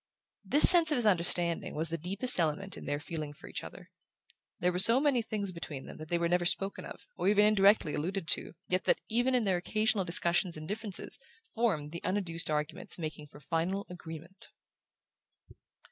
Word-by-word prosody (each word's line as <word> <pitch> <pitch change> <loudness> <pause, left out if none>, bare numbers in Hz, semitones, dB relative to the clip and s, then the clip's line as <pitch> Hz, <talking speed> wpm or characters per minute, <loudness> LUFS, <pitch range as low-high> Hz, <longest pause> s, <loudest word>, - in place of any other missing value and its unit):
This 295 - +10
sense 340 -3 +8
of - - +1
his 240 -3 -1
understanding 170 -3 +1
was 160 +1 -3
the 165 - -4
deepest 195 - -4
element 170 +4 -2
in - - -11
their 145 0 -3
feeling 155 -2 -7
for - - -15
each - - -7
other. - - -13 0.7
There 180 +1 0
were 180 - -3
so 230 +6 +7
many 275 -4 +1
things 210 -3 -2
between 155 -6 -9
them - - -12
that 155 +2 -4
were 170 - 0
never 175 +1 0
spoken 195 +3 -1
of, - - -12
or - - -2
even 205 +1 +3
indirectly 200 -6 +3
alluded 180 +3 -4
to, - - +3
yet 185 +1 -2
that, - - +1
even 245 +3 0
in 245 - +1
their 190 -3 0
occasional 215 +3 0
discussions 175 0 -1
and 155 0 -9
differences, 205 -1 -4 0.3
formed 180 -11 -2
the 170 - -8
unadduced 180 -5 -2
arguments 150 +1 -3
making 155 -3 -7
for 145 - -16
final 165 +7 -3
agreement... 170 +1 -10
180 Hz, 185 wpm, -29 LUFS, 165-205 Hz, 0.7 s, This